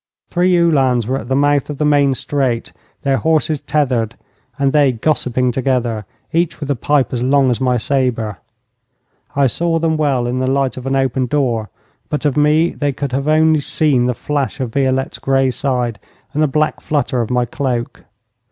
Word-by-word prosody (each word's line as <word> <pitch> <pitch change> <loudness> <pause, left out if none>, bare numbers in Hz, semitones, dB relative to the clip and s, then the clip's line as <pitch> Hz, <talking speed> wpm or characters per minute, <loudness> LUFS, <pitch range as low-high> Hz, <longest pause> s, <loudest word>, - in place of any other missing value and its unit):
Three 180 0 +3
Uhlans 135 -8 +2
were 130 +4 -1
at 110 - -9
the 130 - 0
mouth 145 0 +2
of 145 - -5
the 150 - 0
main 145 -2 +3
street, 130 -4 -2 0.3
their 135 -2 +2
horses 155 -1 +1
tethered, 125 -6 0 0.4
and 140 -1 +1
they 145 -3 +4
gossiping 125 -1 0
together, 120 -5 -1 0.3
each 170 0 0
with 145 -2 -3
a - - +1
pipe 140 +2 +1
as 120 - -1
long 135 0 +3
as 120 - -2
my 125 -1 +2
sabre. 120 -5 -1 1.0
I 140 0 +3
saw 165 +6 0
them 160 -1 0
well 140 -5 +1
in 125 +1 -1
the 130 0 0
light 135 -1 0
of 130 0 -7
an 135 - 0
open 130 -1 0
door, 120 -6 0 0.4
but 150 - -3
of 145 - +1
me 150 +3 +3
they 145 -1 -2
could 140 0 -4
have 135 +2 -1 0.4
seen 150 -4 +1
only 120 - +2
the 125 - +1
flash 145 +1 -2
of 125 -4 -3
Violette's 135 -1 0
grey 135 -1 +2
side 125 -5 -2 0.3
and 150 - 0
the 155 - +4
black 150 +2 0
flutter 135 -4 0
of 115 - -3
my 125 -1 +1
cloak. 125 -2 -3
135 Hz, 190 wpm, -17 LUFS, 125-145 Hz, 1.0 s, they